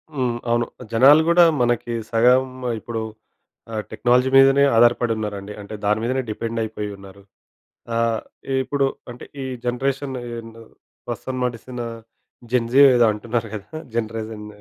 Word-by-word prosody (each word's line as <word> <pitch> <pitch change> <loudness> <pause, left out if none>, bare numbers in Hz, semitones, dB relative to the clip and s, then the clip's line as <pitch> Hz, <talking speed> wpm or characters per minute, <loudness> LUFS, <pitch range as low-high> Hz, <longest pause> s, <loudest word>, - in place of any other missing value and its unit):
హ్మ్. 125 -3 -1
అవును. 120 0 +2 0.3
జనాలు 140 +7 +7
గూడా 175 0 +6 0.2
మనకి 120 -1 0 0.2
సగం 125 +3 +4 0.3
ఇప్పుడు 115 +1 -5 0.7
ఆహ్, 110 -1 -2
టెక్నాలజీ 125 +4 +2
మీదనే 135 +1 +6
ఆధారపడి 120 0 +4
ఉన్నారండి. 105 -1 -5
అంటే 100 +1 -10
దాని 105 +1 +2
మీదనే 130 +2 0
డిపెండయిపోయి 110 -1 -3
ఉన్నారు. 100 0 -14 0.7
ఆహ్, 115 -1 +1 0.4
ఇప్పుడు 140 0 0 0.2
అంటే 120 - -10 0.2
ఈ - - -3 0.2
జనరేషన్ 135 +2 -2
యే - - -7
యందు 115 0 -13 0.4
ప్రస్తుతం 130 - -5
నడుస్తునా 120 0 -4 0.7
జన్‌జీ 125 +2 +3
ఏదో 120 -1 +5
అంటున్నారు 115 +1 -3
గదా! 110 +10 -7 0.2
జనరేషన్ 110 -1 -4
120 Hz, 125 wpm, -22 LUFS, 110-125 Hz, 0.7 s, జనాలు